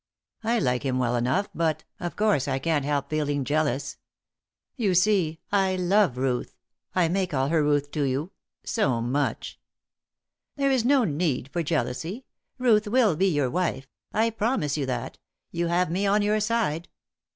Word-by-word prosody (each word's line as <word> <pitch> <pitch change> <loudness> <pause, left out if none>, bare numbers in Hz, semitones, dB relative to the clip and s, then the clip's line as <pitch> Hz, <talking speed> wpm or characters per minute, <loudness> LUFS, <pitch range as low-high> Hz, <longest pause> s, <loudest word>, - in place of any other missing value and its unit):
I 230 +2 +1
like 125 - +1
him 130 -3 -1
well 125 -1 +1
enough 130 +12 +1
but, 160 -2 0 0.2
of 175 -1 -4
course, 205 -10 +2
I 135 -1 0
can't 150 +1 0
help 145 -1 -1
feeling 145 -2 0
jealous. 145 -2 -1 0.8
You 205 -8 +1
see, 180 -4 +2
I 195 -2 +2
love 185 -6 +2
Ruth 130 -1 -1 0.4
I 180 -2 +3
may 185 +2 0
call 135 -4 -1
her 160 -1 +2
Ruth 145 -1 +1
to 150 - -2
you 140 +7 -2 0.3
so 135 - 0
much." 130 +5 -2 1.0
"There 275 -1 +1
is 260 -4 +2
no 265 +1 +4
need 150 - -1
for 175 - 0
jealousy. 160 - -2 0.3
Ruth 225 -4 +3
will 220 -5 +3
be 190 +5 +2
your 145 -8 +1
wife. 175 -6 -1 0.3
I 225 +1 +1
promise 215 - 0
you 140 -3 -2
that; 130 - -4 0.3
you 170 0 -1
have 175 0 +1
me 195 +3 0
on 205 +1 +3
your 210 +1 +2
side." 210 -7 -1
165 Hz, 165 wpm, -26 LUFS, 140-205 Hz, 1.0 s, no